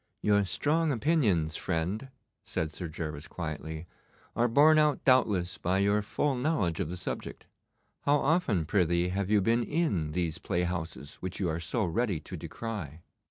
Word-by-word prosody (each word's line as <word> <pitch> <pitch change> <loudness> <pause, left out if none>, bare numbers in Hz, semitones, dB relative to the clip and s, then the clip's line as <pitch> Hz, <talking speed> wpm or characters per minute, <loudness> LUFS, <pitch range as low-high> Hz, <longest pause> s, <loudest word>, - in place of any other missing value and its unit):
'Your 105 -1 +4
strong 155 - +1
opinions, 110 - +2
friend,' 95 +9 -2 0.3
said 80 -1 -3
Sir 90 - -5
Gervas 75 -1 -5
quietly, 80 -1 -5 0.5
'are 120 - +3
borne 150 +6 +6
out 150 -1 +2
doubtless 100 -8 +3
by 90 +2 +1
your 100 +2 +3
full 140 +7 0
knowledge 125 - 0
of 90 -5 -1
the 90 - -5
subject. 90 - -5 0.6
How 145 +1 +5
often, 140 - +1
prythee, 85 0 +2
have 95 +1 -2
you 105 -1 +4
been 115 +4 +2
in 115 - 0
these 85 -2 -1
playhouses 85 -6 -3
which 95 0 -5
you 95 -4 0
are 80 +1 -2
so 85 +7 -1
ready 100 0 0
to - - -8
decry? 85 -10 -6
95 Hz, 160 wpm, -29 LUFS, 85-120 Hz, 0.6 s, borne